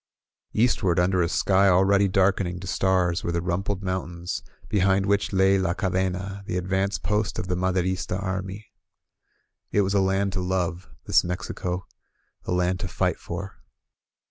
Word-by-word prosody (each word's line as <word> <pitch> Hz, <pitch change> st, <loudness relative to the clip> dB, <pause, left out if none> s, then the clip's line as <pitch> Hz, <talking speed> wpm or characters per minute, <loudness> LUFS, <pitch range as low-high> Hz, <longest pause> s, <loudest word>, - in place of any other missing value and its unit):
• -, -, -6 dB
• -, -, +2 dB
• -, -, +6 dB
Eastward, 95 Hz, -8 st, +2 dB
imder 90 Hz, 0 st, +3 dB
a 85 Hz, -, 0 dB
sky 95 Hz, +1 st, +3 dB
ulready 95 Hz, +2 st, +4 dB
darkening 95 Hz, -2 st, +2 dB
to 95 Hz, -, -8 dB
stars, 90 Hz, -2 st, +1 dB
were 85 Hz, -, -1 dB
the 85 Hz, -, 0 dB
rumpled 95 Hz, +3 st, -2 dB
mountains 90 Hz, -2 st, -3 dB, 0.3 s
behind 95 Hz, -1 st, +2 dB
which 100 Hz, 0 st, +1 dB
lay 95 Hz, 0 st, +4 dB
La 90 Hz, -2 st, 0 dB
Ca 95 Hz, -, -1 dB
dena, 95 Hz, +1 st, -2 dB
the 90 Hz, -, -1 dB
advance 95 Hz, +2 st, 0 dB
post 105 Hz, 0 st, -1 dB
of -, -, -3 dB
the 90 Hz, -, -1 dB
Maderista 95 Hz, +1 st, -1 dB
army. 95 Hz, +2 st, -4 dB, 1.1 s
It 105 Hz, -, +3 dB
was 100 Hz, 0 st, 0 dB
a 100 Hz, -, +4 dB
land 95 Hz, 0 st, +1 dB
to 95 Hz, -, -1 dB
love 90 Hz, -1 st, -2 dB
— -, -, -38 dB
this -, -, +4 dB
Mexico 90 Hz, 0 st, -4 dB, 0.3 s
— -, -, -43 dB
a -, -, -1 dB
land 90 Hz, +1 st, +1 dB
to 90 Hz, -, -3 dB
fight 85 Hz, -, -1 dB
for. -, -, -7 dB
95 Hz, 180 wpm, -25 LUFS, 90-95 Hz, 1.1 s, •